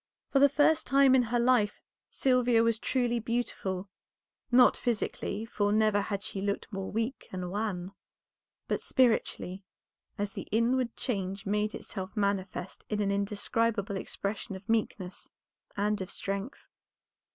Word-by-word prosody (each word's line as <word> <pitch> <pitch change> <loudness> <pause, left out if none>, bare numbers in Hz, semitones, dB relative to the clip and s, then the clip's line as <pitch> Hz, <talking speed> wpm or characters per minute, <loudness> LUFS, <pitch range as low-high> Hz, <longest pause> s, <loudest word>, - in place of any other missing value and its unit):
For 275 - +4
the 285 +1 +7
first 295 +3 +3
time 275 0 +5
in 260 - +6
her 240 0 0
life 235 -4 +3 0.3
Sylvia 245 -3 +3
was 230 -1 +2
truly 240 -2 0
beautiful, 210 -5 -2 0.6
not 250 0 +7
physically, 220 -2 -2
for 205 -2 0
never 215 -1 +3
had 200 0 -3
she 195 - -4
looked 200 +2 -2
more 195 -1 -4
weak 225 +5 -2
and 180 -1 -4
wan, 195 -3 -2 0.8
but - - -1
spiritually, 220 -6 +1 0.5
as 200 -1 -2
the - - -6
inward 235 +2 +1
change 195 -4 -3
made 210 +1 0
itself 190 +1 -7
manifest 195 -2 -2
in 210 - -1
an 200 -1 +1
indescribable 205 +1 0
expression 200 +1 -4
of 190 +2 -11
meekness 210 -4 -2 0.5
and 210 0 +1
of 190 - -5
strength. 200 +7 -4
210 Hz, 140 wpm, -30 LUFS, 200-235 Hz, 0.8 s, the